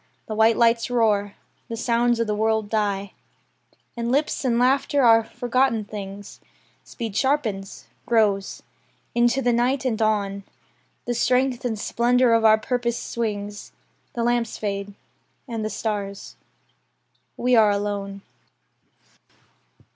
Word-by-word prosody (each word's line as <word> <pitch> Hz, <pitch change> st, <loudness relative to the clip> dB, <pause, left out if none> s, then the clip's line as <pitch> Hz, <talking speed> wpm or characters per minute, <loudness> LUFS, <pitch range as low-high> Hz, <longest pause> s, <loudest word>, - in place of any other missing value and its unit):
The 220 Hz, -, -5 dB
white 220 Hz, +1 st, +3 dB
lights 230 Hz, +1 st, +3 dB
roar. 210 Hz, -4 st, +1 dB, 0.3 s
The 230 Hz, -, -4 dB
sounds 235 Hz, 0 st, +1 dB
of 230 Hz, -, +1 dB
the 210 Hz, -, -1 dB
world 220 Hz, 0 st, 0 dB
die. 200 Hz, -2 st, -1 dB, 0.8 s
And 235 Hz, 0 st, -2 dB
lips 290 Hz, +2 st, 0 dB
and 240 Hz, -3 st, +1 dB
laughter 270 Hz, +3 st, +2 dB
are 225 Hz, -1 st, +6 dB
forgotten 245 Hz, -1 st, 0 dB
things. 205 Hz, -1 st, -8 dB, 0.4 s
Speed 225 Hz, -5 st, -7 dB
sharpens; 225 Hz, -9 st, -1 dB, 0.2 s
grows. 210 Hz, -4 st, +1 dB, 0.5 s
Into 240 Hz, +3 st, +2 dB
the 245 Hz, 0 st, +2 dB
night, 255 Hz, +3 st, +1 dB
and 230 Hz, -3 st, -1 dB
on, 200 Hz, -2 st, 0 dB, 0.6 s
The 240 Hz, -, -1 dB
strength 250 Hz, +1 st, +1 dB
and 225 Hz, -3 st, -1 dB
splendour 240 Hz, +3 st, +2 dB
of 230 Hz, -1 st, +3 dB
our 220 Hz, -1 st, +6 dB
purpose 240 Hz, +1 st, -2 dB
swings. 205 Hz, -3 st, -5 dB, 0.4 s
The 235 Hz, -, -2 dB
lamps 240 Hz, -1 st, 0 dB
fade; 200 Hz, -1 st, -4 dB, 0.5 s
and 230 Hz, -3 st, -4 dB
the 215 Hz, -, -2 dB
stars. 200 Hz, -2 st, -4 dB, 1.0 s
We 250 Hz, 0 st, +2 dB
are 220 Hz, -2 st, +6 dB
alone. 200 Hz, -1 st, -3 dB
225 Hz, 125 wpm, -23 LUFS, 205-240 Hz, 1.0 s, are